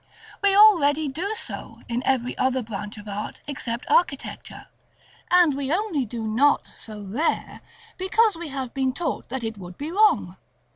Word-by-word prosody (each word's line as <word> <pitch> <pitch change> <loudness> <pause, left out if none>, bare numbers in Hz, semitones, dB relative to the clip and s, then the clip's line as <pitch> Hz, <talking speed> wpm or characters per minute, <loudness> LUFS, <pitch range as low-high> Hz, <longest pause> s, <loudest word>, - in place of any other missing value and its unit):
We 395 -1 +4
already 315 -8 +6
do 365 +10 -3
so, - - -5
in 240 +1 -1
every 255 -2 +1
other 260 -1 +1
branch 210 -1 -6
of 210 0 -10
art 205 +1 -5
except 245 -4 -4
architecture, 280 -6 0 0.6
and 355 -4 +5
we 275 0 -3
only 340 - 0
do 230 +1 -5
not 250 +7 +3
so 215 -2 -9
there 235 +12 -2 0.4
because 415 +2 +3
we 335 0 -6
have 270 -3 -5
been 265 -1 0
taught 335 +3 -3
that 260 0 -4
it 225 -2 -4
would 180 -1 -10
be 295 +3 -5
wrong. 425 +3 +3
270 Hz, 160 wpm, -24 LUFS, 230-345 Hz, 0.6 s, already